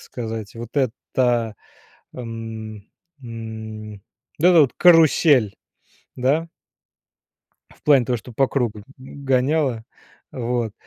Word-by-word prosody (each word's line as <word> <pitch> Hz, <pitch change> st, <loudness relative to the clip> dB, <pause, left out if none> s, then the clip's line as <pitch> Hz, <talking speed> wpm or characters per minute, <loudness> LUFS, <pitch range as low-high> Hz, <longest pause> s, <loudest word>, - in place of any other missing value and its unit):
сказать, 110 Hz, -3 st, -6 dB
вот 120 Hz, +4 st, -5 dB
эта, 120 Hz, -3 st, 0 dB, 0.6 s
эм, 110 Hz, -3 st, -8 dB, 0.3 s
м, 110 Hz, -2 st, -8 dB, 0.5 s
вот 165 Hz, -, -1 dB
эта 170 Hz, -3 st, +7 dB
вот 135 Hz, -, +1 dB
карусель, 155 Hz, -, +5 dB, 0.6 s
да? 140 Hz, +6 st, +1 dB, 1.3 s
В -, -, -29 dB
плане 140 Hz, -5 st, +5 dB
того, 125 Hz, +1 st, 0 dB
что 120 Hz, +2 st, -11 dB
по 135 Hz, +3 st, +2 dB
кругу 120 Hz, -6 st, -1 dB
г 100 Hz, -, -16 dB
гоняло, 135 Hz, -2 st, -1 dB, 0.5 s
вот, 120 Hz, -3 st, -2 dB
120 Hz, 105 wpm, -22 LUFS, 110-135 Hz, 1.3 s, эта